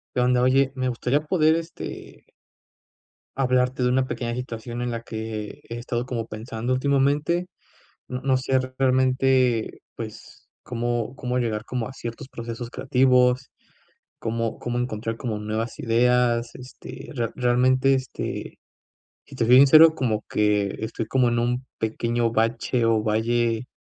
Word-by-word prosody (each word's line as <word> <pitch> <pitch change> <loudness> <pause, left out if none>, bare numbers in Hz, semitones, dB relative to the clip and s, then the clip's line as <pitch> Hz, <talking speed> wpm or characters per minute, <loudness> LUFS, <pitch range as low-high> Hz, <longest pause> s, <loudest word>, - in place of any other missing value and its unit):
Qué 125 - +2
onda, 125 0 +3
oye, 135 +1 +3
me 130 -1 -1
gustaría 125 +3 0
poder, 155 -1 +3
este 165 0 -7 1.1
hablarte 130 -1 +1
de - - +3
una 130 +1 +2
pequeña 120 -2 -3
situación 120 -1 -5
en 120 - -2
la 115 -1 -4
que 110 -2 -6
he 115 - -5
estado 120 0 -3
como 120 -3 -4
pensando 115 +3 -4
últimamente. 145 +6 +1 0.6
No 125 0 -5
no 135 -1 +2
sé 130 0 +1 0.2
realmente, 130 -2 +2
pues, - - -10
cómo 120 0 -2
cómo 125 0 -2
llegar 110 -3 -1
como 125 -3 -3
a 130 - -10
ciertos 115 -1 -7
procesos 115 -1 -6
creativos, 125 -1 +2 0.7
cómo 115 0 -2
cómo 120 0 -2
encontrar 115 -2 -3
como 115 -4 -3
nuevas 110 +2 -3
ideas. 120 0 +2
Este, 130 +4 -10
rea 115 -3 -2
realmente, 130 +2 +3
este, 130 -1 -5 0.7
si 140 - -13
te 120 -3 0
soy 125 - +6
sincero, 155 +4 +8
como 110 -6 -1
que 105 -2 +1
estoy 110 0 -4
como 125 0 +2
en 120 - 0
un 125 +2 -1
pequeño 115 +1 0
bache 115 +2 0
o 115 -1 +3
valle, 115 +2 0
125 Hz, 145 wpm, -24 LUFS, 115-130 Hz, 1.1 s, sincero